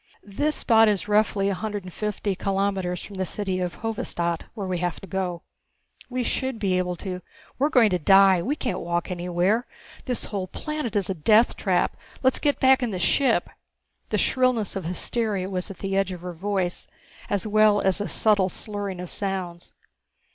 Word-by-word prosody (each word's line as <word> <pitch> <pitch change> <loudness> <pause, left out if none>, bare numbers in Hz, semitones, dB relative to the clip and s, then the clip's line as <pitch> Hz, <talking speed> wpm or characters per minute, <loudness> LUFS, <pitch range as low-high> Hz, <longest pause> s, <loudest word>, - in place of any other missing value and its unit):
"This 290 +10 -1
spot 225 -2 +5
is 205 -1 0
roughly 210 -1 +2
a - - 0
hundred 205 +1 -4
and 180 -1 -10
fifty 210 -1 -2
kilometres 195 -2 -1
from 200 - -9
the 190 - 0
city 190 -1 -2
of 180 -1 -4
Hovedstad, 170 -6 -2
where 205 -4 -4
we 185 -2 -2
have 175 0 -2
to - - -8
go. 185 -3 -3 0.7
We 250 0 -1
should 260 +1 -2
be 195 -4 0
able 180 -1 -1
to 180 0 -5 0.2
" - - -26
"We're 285 +3 +3
going 235 -8 +5
to 180 - +1
die. 195 +1 +6
We 275 - -1
can't 255 - -3
walk 175 +1 -2
anywhere. 180 +6 0 0.4
This 250 -3 -2
whole 195 -3 -4
planet 300 -2 -4
is 195 -2 +1
a - - 0
death 215 +7 +4
trap. - - +1 0.3
Let's 260 0 +3
get 290 -2 +1
back 265 0 +5
in 245 - 0
the 190 - -3
ship!" 265 +9 +2 0.6
The - - +1
shrillness 255 -6 +1
of 190 -4 -4
hysteria 195 +2 -1
was 185 +1 -2
at 195 - -8
the 195 -1 -3
edge 195 -1 +1
of 180 -2 -7
her 180 0 -6
voice, 185 0 -2 0.4
as 205 +1 0
well 215 -1 +4
as 190 0 +1
a 205 - -2
subtle 205 -4 +2
slurring 205 -2 -5
of 180 -1 -5
sounds. 185 -3 -4
195 Hz, 190 wpm, -25 LUFS, 180-220 Hz, 0.7 s, die